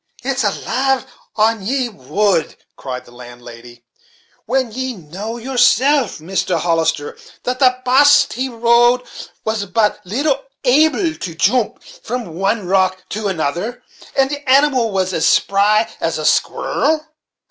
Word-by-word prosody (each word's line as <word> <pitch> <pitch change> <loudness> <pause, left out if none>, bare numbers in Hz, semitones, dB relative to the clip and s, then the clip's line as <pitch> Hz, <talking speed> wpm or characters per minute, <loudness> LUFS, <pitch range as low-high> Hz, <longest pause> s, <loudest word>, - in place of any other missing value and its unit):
"Is - - -1
it - - -2
lade 270 -1 0 0.3
on 220 0 +2
ye 255 +4 -1
would," 195 - -1 0.2
cried 125 -2 -7
the - - -17
landlady, 120 -1 -13 0.6
"when 260 0 0
ye 260 +2 -3
know 195 +7 -7
yourself, 260 +2 +2
Mr. 175 +4 -2
Hollister, 165 -3 0 0.3
that 250 +1 -2
the 255 -2 +4
baste 285 +3 +5
he 260 +3 -3
rode 240 +1 +3 0.4
was 220 -2 -2
but 210 +3 +1
little 275 - -1 0.2
able 310 +6 +3
to 170 - -7
joomp 220 +7 0
from 230 -7 -7
one 195 +4 -1
rock 185 0 +1
to 210 0 -3
another, 190 - -3 0.3
and 270 0 +3
the 290 0 -4
animal 265 -4 +3
was 190 -1 -1
as 160 - +1
spry 210 +3 +3
as - - -1
a - - -4
squirrel? 310 0 +1
225 Hz, 135 wpm, -18 LUFS, 185-260 Hz, 0.6 s, baste